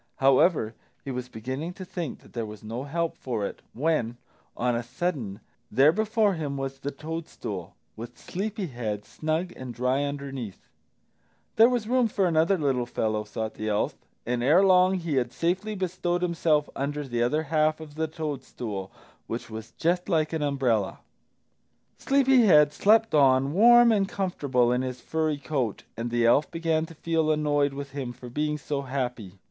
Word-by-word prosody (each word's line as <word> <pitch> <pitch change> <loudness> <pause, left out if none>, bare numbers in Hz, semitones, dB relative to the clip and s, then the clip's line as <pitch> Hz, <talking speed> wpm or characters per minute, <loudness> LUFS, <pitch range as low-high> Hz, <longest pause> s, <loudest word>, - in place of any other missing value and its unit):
However, 135 -3 +3 0.3
he 135 - -3
was 125 0 -5
beginning 130 +10 -5
to 185 - -8
think 170 -6 -5
that - - -19
there 115 - -2
was 105 0 -10
no 115 +5 -5
help 165 +3 -2
for 115 -6 -3
it, - - -6
when, 125 -4 0 0.4
on 125 0 +1
a 120 - 0
sudden, 120 - -3 0.3
there 135 +7 +5
before 215 +1 +2
him 145 -5 -3
was 135 0 -4
the 140 - -3
toadstool, 160 +3 -6 0.2
with 120 +2 -9
Sleepy 205 +2 -4
head 110 - -4
snug 160 +3 -2
and 125 -2 -7
dry 125 +3 +1
underneath! 140 -7 -5 0.9
There 225 +2 +7
was 240 -4 -1
room 250 0 +3
for 200 -3 0
another 165 +2 +3
little 135 -6 0
fellow, 110 -2 -1
thought 110 +1 -4
the 110 0 -4
elf, 105 0 0 0.3
and 120 0 -1
ere 155 +10 +5
long 185 0 +5
he 165 -6 -2
had 120 -2 0
safely 185 +8 -1
bestowed 180 -1 -1
himself 160 -4 +2
under 145 +2 -2
the 120 -2 -1
other 150 +7 +1
half 155 0 +1
of 155 -2 -10
the 160 +1 -1
toadstool, 130 -10 -5 0.4
which 115 0 -5
was 110 0 -7
just 175 +3 0
like 160 -3 +1
an 160 - -1
umbrella. 130 -8 0 1.0
Sleepy 270 -2 +4
head 150 -4 +6
slept 220 +6 +4
on, 135 -1 +4
warm 240 +4 +7
and 200 -3 +2
comfortable 140 -11 0
in 125 +1 +1
his 130 -1 -4
furry 155 0 -1
coat, 135 -7 -2
and 115 +1 -3
the 120 0 +1
elf 130 +6 +4
began 165 -1 0
to 165 - -13
feel 160 0 0
annoyed 145 -2 +1
with 140 0 -6
him 135 -3 -4
for 120 0 -11
being 150 +3 -1
so 145 -1 -3
happy. 125 -8 -4
145 Hz, 175 wpm, -27 LUFS, 125-170 Hz, 1.0 s, There